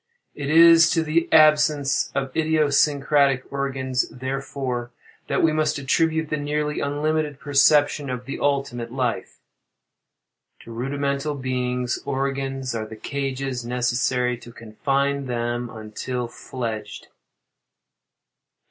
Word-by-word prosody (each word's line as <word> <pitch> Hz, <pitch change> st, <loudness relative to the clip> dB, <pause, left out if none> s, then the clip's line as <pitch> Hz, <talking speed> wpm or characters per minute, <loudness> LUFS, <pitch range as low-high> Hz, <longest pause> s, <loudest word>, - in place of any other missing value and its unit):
It 140 Hz, -1 st, -5 dB
is 165 Hz, 0 st, +7 dB
to 165 Hz, -, +2 dB
the 160 Hz, +2 st, 0 dB
absence 150 Hz, -2 st, +4 dB
of 135 Hz, -1 st, -2 dB
idiosyncratic 145 Hz, -3 st, +2 dB
organs, 135 Hz, -2 st, -1 dB
therefore, 130 Hz, -1 st, -4 dB, 0.4 s
that -, -, 0 dB
we 160 Hz, -1 st, +4 dB
must 155 Hz, -1 st, +1 dB
attribute 160 Hz, +3 st, 0 dB
the 155 Hz, -, 0 dB
nearly 150 Hz, +1 st, -2 dB
unlimited 150 Hz, 0 st, -1 dB
perception 145 Hz, 0 st, +3 dB
of 125 Hz, -1 st, -5 dB
the 135 Hz, -, -5 dB
ultimate 135 Hz, -5 st, -1 dB
life. 125 Hz, -2 st, -2 dB, 1.2 s
To 115 Hz, -, -12 dB
rudimental 140 Hz, +4 st, -2 dB
beings, 125 Hz, -2 st, -2 dB
organs 135 Hz, -1 st, -2 dB
are 110 Hz, -1 st, -3 dB
the 110 Hz, -, -9 dB
cages 135 Hz, 0 st, -4 dB
necessary 125 Hz, 0 st, 0 dB
to 120 Hz, -, -12 dB
confine 135 Hz, +5 st, -2 dB
them 120 Hz, 0 st, -2 dB
until 110 Hz, +3 st, -5 dB
fledged. 110 Hz, -4 st, -6 dB
135 Hz, 110 wpm, -23 LUFS, 125-145 Hz, 1.2 s, is